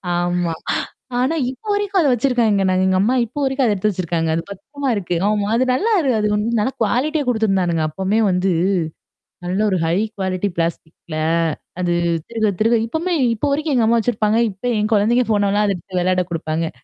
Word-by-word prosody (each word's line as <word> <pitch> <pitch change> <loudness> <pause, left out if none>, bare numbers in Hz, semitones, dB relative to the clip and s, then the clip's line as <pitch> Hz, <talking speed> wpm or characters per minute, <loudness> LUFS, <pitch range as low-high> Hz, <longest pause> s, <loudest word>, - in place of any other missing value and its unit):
ஆமா. 175 -1 0 0.7
ஆனா 265 +6 +1 0.2
இப்போ 265 +12 -13
வரைக்கும் 405 -2 +1
அத 300 - +3
வச்சுருக்காங்க. 235 -5 +2
நாங்க 185 0 +2
எங்க 185 0 +2
அம்மா 235 +6 +2
இப்போ 250 +6 -9
வரைக்கும் 265 0 +1
அத 215 - +2
எடுத்து 205 +2 0
வச்சுருக்காங்க. 170 -3 -2
அது 165 - -1
பத்திரமா 275 +7 -5
இருக்கு. 180 -3 -2
ஆமா, 210 -1 0
அது 255 - +3
நல்லா 415 - +1
இரு 275 -4 +1
அது 210 0 +1
இன்னும் 225 +2 0
நல்லா 260 +5 0
குவாலிடியா 290 +7 0
குடுத்திருந்தானுங்க. 195 -8 +1
அப்பவுமே 190 +7 -1
வந்து 185 +1 +1 1.0
நல்ல 185 +3 -1
ஒரு 185 - +1
ஹை 165 +2 +1 0.2
குவாலிடி 190 0 -1
பிளாஸ்டிக்ல. 165 -1 -4 0.6
அது 175 -1 0 0.4
திருக 225 -2 0
திருக 230 +2 +3
இப்பவுமே 330 +8 -2 0.2
இப்போ 285 +7 -1
வரைக்கும் 300 +1 0
எங்க 235 -3 +3
அம்மா 235 0 +4
வச்சிருப்பாங்க. 215 -1 +1
இப்ப 195 +4 -16 0.2
என் 215 +2 -1
குழந்தைங்க 230 +4 +3
போனால்லாம், 205 0 +2
அத 200 - +1
எடுத்து 180 +1 -4
வெளையாட 185 0 +1
குடுப்பாங்க. 160 0 -2
210 Hz, 180 wpm, -19 LUFS, 185-245 Hz, 1.0 s, அம்மா